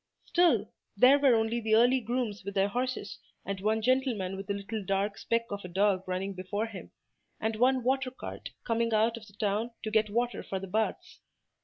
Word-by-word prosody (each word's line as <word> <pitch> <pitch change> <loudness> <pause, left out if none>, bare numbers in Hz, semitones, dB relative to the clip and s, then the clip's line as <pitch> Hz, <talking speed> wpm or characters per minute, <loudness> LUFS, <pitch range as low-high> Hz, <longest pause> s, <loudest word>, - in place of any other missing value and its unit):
Still, 350 -1 +3 0.3
there 270 +3 +7
were 270 -4 +5
only 225 +1 +1
the 220 -1 +2
early 245 +3 +5
grooms 235 -3 -3
with 200 +1 -6
their 195 +1 +2
horses, 245 -3 -3 0.3
and 195 -1 -4
one 220 +2 +1
gentleman 245 -7 +1
with 195 0 -8
a - - +1
little 200 +2 -5
dark 195 +2 0
speck 230 0 0
of 200 0 -4
a - - -6
dog 190 +1 +1
running 185 +2 -2
before 190 +4 -3
him, 215 -4 -9 0.5
and 220 0 -1
one 255 +2 +3
water 265 +1 +1
cart 255 - -8
coming 230 -1 0
out 225 +2 +3
of 225 -2 -11
the 200 - -17
town 210 +3 -1
to 215 - -3
get 215 -1 +2
water 240 +3 -1
for 195 - -4
the 190 - -5
baths. 215 +4 -2
220 Hz, 200 wpm, -29 LUFS, 200-240 Hz, 0.5 s, there